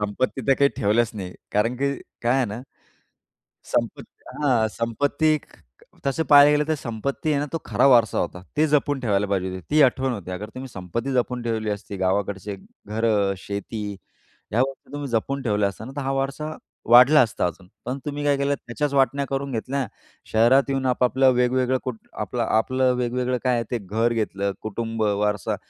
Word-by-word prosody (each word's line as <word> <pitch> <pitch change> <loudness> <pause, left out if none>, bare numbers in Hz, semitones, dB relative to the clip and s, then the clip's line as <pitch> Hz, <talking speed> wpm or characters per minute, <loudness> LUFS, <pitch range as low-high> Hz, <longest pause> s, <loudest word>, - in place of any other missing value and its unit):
संपत्ती 110 +4 -2
तर 135 - +6
काही 140 0 +5
ठेवलंच 110 +3 +2
नाही 95 -3 -6 0.2
कारण 115 +4 +1
की 140 +2 0 0.3
काय 120 +3 +2
आहे 130 - +2
ना, 105 +4 -6 1.1
संपत्ती - - -3 0.2
हां, 125 -6 +3
संपत्ती 145 +8 +1
ख - - -19 0.5
तसं 150 +4 +1
पाहायला 145 0 +9
गेलं 150 0 +3
तर 155 - +2
संपत्ती 140 +4 -3
आहे 145 - +2
ना 145 - -2
तो 165 - -1
खरा - - +2
वारसा 120 -5 +5
होता. 90 +1 -3
ती 155 - +4
जपून 145 -2 +1
ठेवायला 105 -4 +1
पाहिजे 95 -2 -1
होती, 95 0 -6
ती 150 0 +5
आठवण 130 0 +2
होती. 95 -5 -6
अगर 100 +4 -5
तुम्ही 130 +1 -7
संपत्ती 115 +7 -4
जपून 125 -1 0
ठेवली 110 -2 -2
असती, 100 -1 -5
गावाकडचे 95 +1 -1 0.3
घरं, 105 -2 +1
शेती 100 +3 -5 0.7
ह्या 115 - +2
गोष्टी 135 +1 -5
तुम्ही 145 -1 -4
जपून 135 +4 -1
ठेवल्या 105 -4 +1
असत्या 110 +3 -9
ना, 135 - -8
तर - - -2
हा 135 - 0
वारसा 140 +3 -3 0.3
वाढला 125 +5 +8
असता 110 -6 +1
अजून. 90 +2 -7 0.2
पण 130 +3 -3
तुम्ही 145 0 -4
काय 145 -1 +3
केलं? 140 +1 +1
त्याच्याच 140 +3 -3
वाटण्या 140 +1 +2
करून 135 0 -3
घेतल्या. 130 +3 -2 0.5
शहरात 120 +5 +5
येऊन 135 -1 -1
आपापलं 130 +1 +3
वेगवेगळं 125 +1 +2
कुटुं 125 -4 -6
आपलं-आपलं 120 +4 +1
वेगवेगळं 125 +1 -1
काय 125 -1 +3
आहे 115 - +1
ते 120 - 0
घर 110 +4 0
घेतलं. 100 -3 -1
कुटुंब 115 +1 -3
वारसा 105 -1 0
120 Hz, 180 wpm, -24 LUFS, 105-135 Hz, 1.1 s, पाहायला